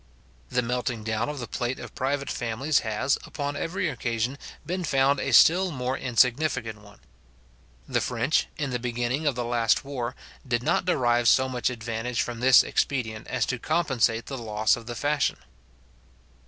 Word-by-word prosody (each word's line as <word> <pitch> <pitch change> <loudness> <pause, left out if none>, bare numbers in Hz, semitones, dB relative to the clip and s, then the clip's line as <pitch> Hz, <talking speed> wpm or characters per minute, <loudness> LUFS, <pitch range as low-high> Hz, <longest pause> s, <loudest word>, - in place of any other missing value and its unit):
The 125 0 0
melting 125 -1 -2
down 110 +2 -1
of 150 - -5
the 125 - -4
plate 125 +1 -3
of - - -9
private 140 +1 -2
families 125 +6 0
has, 110 +4 0
upon 145 -1 -4
every 185 +5 -2
occasion, 120 -1 -2 0.3
been 180 +1 -3
found 135 -2 +2
a 135 - -2
still 180 +9 +6
more 130 -4 -2
insignificant 120 -3 +1
one. 105 0 -17 0.9
The - - 0
French, 125 +5 0
in 145 -4 -2
the 125 - -1
beginning 120 +5 -2
of 140 - +1
the 120 0 -2
last 120 +1 +1
war, 130 -3 -4 0.3
did 120 -1 0
not 170 +5 +1
derive 120 -8 +2
so 130 +3 +5
much 125 -1 -1
advantage 115 -1 -2
from 120 -1 -6
this 130 +1 +7
expedient 110 -6 -2
as 125 -3 0
to 125 - -3
compensate 125 -7 +1
the 135 -2 -6
loss 110 -1 +1
of 115 -1 -11
the 120 - -5
fashion. 145 +4 0
125 Hz, 170 wpm, -26 LUFS, 115-140 Hz, 0.9 s, this